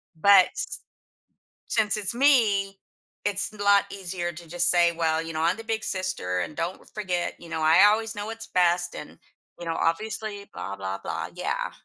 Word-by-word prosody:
But 190 +3 +7
s - - -4 0.9
since 215 -1 +1
it's 205 0 -1
me, 215 -8 +3 0.5
it's 205 +1 -1
n 210 - -14
a - - -1
lot 200 0 +5
easier 180 -2 -4
to 170 +1 -12
just 175 +1 +1
say, 175 -1 +4
"Well, 160 -1 0
you 165 0 -6
know, 155 - -2
I'm 170 +4 +2
the 225 - -8
big 225 0 -2
sister 140 - -2
and 155 - -5
don't 175 +3 -3
w - - -20
forget, 185 -4 -2
you 170 - -12
know, 160 - -3
I 160 +6 +6
always 220 +1 +1
know 205 +1 -5
what's 225 0 -7
best 175 -1 +1
and, - - -9 0.4
you 175 - -7
know, 165 - -1
obviously 205 +3 -2
blah 100 - -5
blah 95 0 -4
blah," - - -4
yeah. - - -2
185 Hz, 200 wpm, -26 LUFS, 170-210 Hz, 0.9 s, But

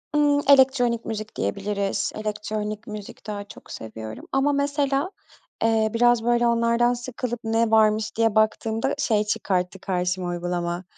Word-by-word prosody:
Hımm 290 -1 +3
elektronik 260 -4 +4
müzik 215 0 -5
diyebiliriz, 200 0 -1
elektronik 215 0 -4
müzik 210 0 -9
daha 205 -1 -4
çok 200 - -14
seviyorum 110 0 -8
ama, 275 +2 +2
mesela, 280 +3 0 0.5
eee, 225 -1 +3
biraz 240 0 +3
böyle 240 0 +3
onlardan 235 +1 +2
sıkılıp 245 0 -4
ne 225 0 +1
varmış 215 0 +3
diye 225 -1 +2
baktığımda 220 +2 +1
şey 225 -8 +1
çıkarttı 190 -3 -1
karşıma 180 -1 -1
uygulama, 175 0 -3
220 Hz, 130 wpm, -24 LUFS, 205-240 Hz, 0.5 s, elektronik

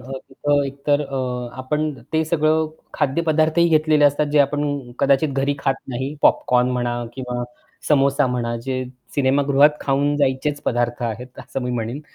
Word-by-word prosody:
अ, 130 +2 -10 0.2
तिथं 145 +2 +1
एकतर 140 +1 0
अ, 130 -3 -3
आपण 150 +4 -1 0.2
ते 160 0 +2
सगळे 155 -1 +1 0.4
खाद्यपदार्थही 160 +3 +2
घेतलेले 155 -2 +3
असतात 145 +1 +3
जे 150 - +4
आपण 145 -2 -1
कदाचित 140 +2 +3
घरी 135 +1 0
खात 135 -1 +1
नाही. 130 +3 -4
पॉपकॉर्न 125 0 +3
म्हणा 120 -1 -2
किंवा 125 -1 -4 0.5
समोसा 140 -2 +3
म्हणा, 120 -2 -2
जे 130 +2 -3 0.3
सिनेमागृहात 140 +1 +4
खाऊन 140 +1 +1
जायचेच 145 +1 0
पदार्थ 120 0 -1
आहेत 120 +2 -5
असं 135 - -5
मी 125 - -2
म्हणेन. 120 +3 -3
135 Hz, 150 wpm, -21 LUFS, 125-145 Hz, 0.5 s, जे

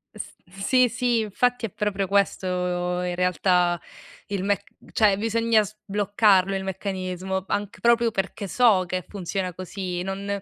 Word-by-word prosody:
S - - -7 0.2
sì 245 +7 +2
sì, 245 0 +1
infatti 235 +3 0
è - - -12
proprio 200 0 -2
questo 200 -1 +1 0.5
in 180 0 -2
realtà 180 -1 +2 0.5
il 200 -2 -3
mec 200 0 0 0.3
cioè 210 -3 +4
bisogna 225 +1 +2
sbloccarlo 205 -1 +2
il 190 - -2
meccanismo, 190 -1 -3
anc 205 +3 -3
proprio 235 0 +4
perché 195 0 -3
so 215 -3 +4
che 185 0 -3
funziona 185 -1 -4
così, 185 0 -5
non, 195 +2 -4
195 Hz, 140 wpm, -24 LUFS, 185-215 Hz, 0.5 s, cioè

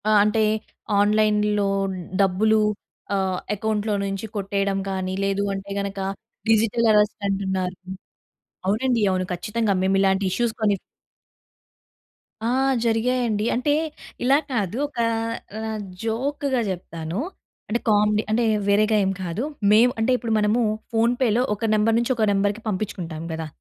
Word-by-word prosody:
ఆహ్, 215 -1 +6
అంటే 215 +1 +2 0.6
ఆన్‌లైన్‌లో 210 0 +2 0.5
డబ్బులు, 215 +3 +3 0.5
ఆహ్, 190 -1 0 0.2
అకౌంట్‌లో 215 0 -1
నుంచి 195 +2 -3
కొట్టేయడం 195 -1 -1
కానీ, 190 -1 -2
లేదు 195 0 0
అంటే 195 +1 -6
గనక 200 0 -4 0.5
డిజిటల్ 225 +1 +3
అరెస్ట్ 210 0 +3
అంటున్నారు. 190 -2 -1 0.9
అవునండి. 230 +3 +1
అవును. 185 0 0
ఖచ్చితంగా. 210 +4 -1
మేము 190 +1 +2
ఇలాంటి 195 0 +2
ఇష్యూస్ 235 +5 +1
కొన్ని 205 -2 +3 1.7
ఆ! - - +1 0.4
జరిగాయండి. 230 -1 +1
అంటే 255 +4 +1 0.5
ఇలా 270 +3 +5
కాదు. 210 -3 -1
ఒక 285 - -9 0.6
ఆహ్, 220 -1 -3 0.2
జోక్‌గా 265 +4 -1
చెప్తాను. 170 -1 -5 0.5
అంటే 235 +3 0
కామెడీ 210 0 +3
అంటే 230 +2 +2 0.2
వేరేగా 215 +2 +3
ఏం 190 - +1
కాదు. 180 +6 -3 0.3
మేము 230 +4 +6
అంటే 225 +3 +2
ఇప్పుడు 230 -3 -2
మనము 210 +3 +2 0.3
ఫోన్‌పేలో 235 0 +2
ఒక 225 +2 -2
నంబర్ 215 +1 +3
నుంచి 235 +2 +1
ఒక 220 -2 +2
నంబర్‌కి 205 +2 0
పంపించుకుంటాం 185 -6 -3
కదా! 160 0 -4
210 Hz, 125 wpm, -23 LUFS, 195-225 Hz, 1.7 s, ఆహ్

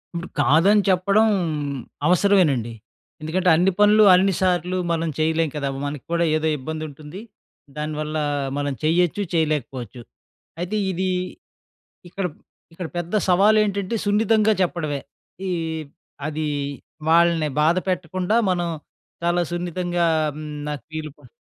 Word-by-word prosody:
ఇప్పుడు 170 +2 -4
కాదని 165 +9 +5
చెప్పడం 195 +4 +3 0.8
అవసరమేనండి. 175 - +3 0.5
ఎందుకంటే 180 +4 0
అన్ని 180 +4 +3
పనులు 210 +1 +6
అన్నిసార్లు 185 -1 +2
మనం 165 0 0
చేయలేం 160 0 +1
కదా! 145 -2 -2 0.2
మనక్కూడా 150 +4 -2
ఏదో 155 0 0
ఇబ్బంది 155 +3 -5
ఉంటుంది. 150 +5 -10 0.6
దానివల్ల 155 0 -3 0.4
మనం 145 -1 -1
చేయొచ్చు, 175 +4 +2
చేయలేకపోవచ్చు. 135 -7 -2 0.6
అయితే 180 +5 -2
ఇది 185 +1 -2 1.0
ఇక్కడ, 195 +1 -2 0.5
ఇక్కడ 175 +1 -6
పెద్ద 175 +3 -4
సవాలు 200 +4 +5
ఏంటంటే 200 +1 -2
సున్నితంగా 215 +1 +3
చెప్పడమే. 155 -5 -2 0.5
ఈ - - -1 0.8
అది 155 0 -3 0.6
వాళ్ళని 170 -2 +4
బాధ 160 +3 +3
పెట్టకుండా 185 +3 -1
మనం 175 -1 0 0.6
చాలా 175 +1 +2
సున్నితంగా 175 0 -1 0.3
హ్మ్, 155 0 -7 0.2
నాకు 145 -5 -6
వీలుపడ 155 -2 -7
170 Hz, 110 wpm, -22 LUFS, 155-185 Hz, 1.0 s, పనులు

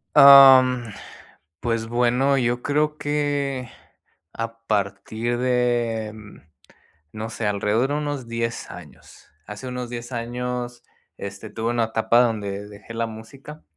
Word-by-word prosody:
Am, 130 -4 +8 0.7
pues 115 -1 -1
bueno, 125 +3 +2
yo 120 -1 0
creo 150 +1 0
que 145 -4 -2 0.6
a 115 0 -5
partir 110 +3 -2
de 120 -3 0 1.0
no 110 +1 -6
sé, 110 -1 -4
alrededor 105 +5 +1
de - - 0
unos 145 -5 -4
10 115 0 -4
años, 75 -7 -14 0.2
hace 105 +5 -8
unos 125 -1 -5
10 120 +1 -7
años, 120 +1 -4 0.4
este, 100 0 -7
tuve 115 +1 -3
una 120 -1 +1
etapa 115 +2 +2
donde 105 -4 -1
dejé 105 +2 -12
la 115 0 -1
música 135 +7 -11
120 Hz, 120 wpm, -23 LUFS, 110-130 Hz, 1.0 s, Am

